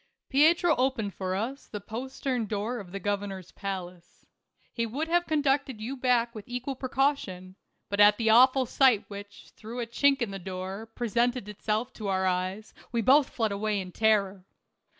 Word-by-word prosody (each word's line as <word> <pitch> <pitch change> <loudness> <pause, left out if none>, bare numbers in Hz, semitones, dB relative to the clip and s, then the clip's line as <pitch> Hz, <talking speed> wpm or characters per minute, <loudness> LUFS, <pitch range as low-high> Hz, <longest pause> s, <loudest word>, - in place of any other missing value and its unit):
Pietro 320 +4 +4
opened 250 -6 0
for 185 -1 -3
us 245 +8 -4
the 210 - -6
postern 245 +2 -3
door 215 +4 -2
of 185 -4 -10
the 195 - -5
governor's 195 -2 -3
palace. 180 -3 -7 0.5
He 230 - -1
would 270 +8 -2
have 345 +1 +1
conducted 280 -5 +1
you 240 +5 -4
back 245 -2 +1
with 215 -3 -9
equal 250 +2 -4
precaution, 255 -9 -1 0.3
but 200 - -3
at 205 0 +7
the 225 -2 +2
awful 255 +3 +6
sight 250 -3 +3
which, 200 0 -10
through 225 +3 -8
a 240 - -1
chink 275 +4 +2
in 215 - -4
the 195 - -5
door, 190 +3 -6
pre 235 +1 -4
sented 240 0 +1
itself 215 +4 -2
to 215 - -6
our 190 -1 +1
eyes, 185 +3 -2 0.2
we 235 -1 0
both 275 +4 +5
fled 220 -3 -1
away 205 +1 -1
in 185 -1 -6
terror. 200 -3 +1
220 Hz, 175 wpm, -28 LUFS, 200-255 Hz, 0.5 s, at